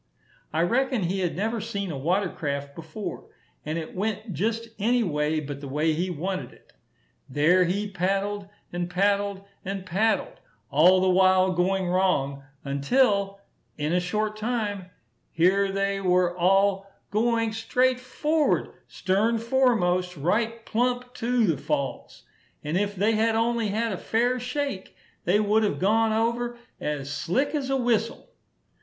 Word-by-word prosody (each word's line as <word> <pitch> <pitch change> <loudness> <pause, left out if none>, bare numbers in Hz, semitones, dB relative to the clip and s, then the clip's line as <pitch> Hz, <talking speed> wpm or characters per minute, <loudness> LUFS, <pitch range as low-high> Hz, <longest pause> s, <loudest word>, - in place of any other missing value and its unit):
I 160 - +1
reckon 245 +3 +1
he 185 +3 -1
had 180 -3 -1
never 220 +4 -1
seen 200 -4 -4
a - - -4
water 185 +7 +1
craft 140 -2 -4
before; 165 +7 -7 0.4
and 155 +2 -3
it 160 -1 -6
went 210 +1 -3
just 225 +7 -2
any 240 +4 +2
way 150 -3 0
but 145 -2 -6
the 140 - -6
way 150 +4 +1
he 175 +4 -1
wanted 185 +3 -3
it. - - -23 0.6
There 165 +7 +4
he 200 +4 -1
paddled, 195 +1 -2 0.2
and 175 0 -2
paddled, 200 +1 +1 0.2
and 195 0 -4
paddled 210 +5 0 0.3
all 180 +6 +6
the 190 - +2
while 185 0 +4
going 185 +1 +1
wrong, 175 -7 +1 0.2
until, 200 - +1 0.4
in 150 +2 -1
a 180 - +3
short 210 +4 -1
time, 210 -5 -2 0.4
here 195 +4 +3
they 195 0 -1
were 180 -1 +2
all 195 +2 +2 0.2
going, 230 +1 +1
straight 250 +3 +1
forward, 300 +4 0
stern 210 +5 +1
foremost, 220 -8 +1
right 225 +9 -1
plump 245 +2 -1
to 240 -1 +1
the 165 -7 +1
falls; 135 +1 -3 0.4
and 150 +3 -2
if 205 +2 0
they 205 +4 +2
had 225 +1 +2
only 230 0 +1
had 225 +3 -1
a 190 - -3
fair 245 +3 +1
shake, 250 -4 -4 0.3
they 190 +5 +3
would 215 +1 +3
have 210 - 0
gone 220 +4 +2
over 235 +2 0 0.2
as 145 -1 -3
slick 180 - 0
as 280 -3 -2
a 270 - +2
whistle. 235 -2 -1
195 Hz, 150 wpm, -26 LUFS, 180-225 Hz, 0.6 s, all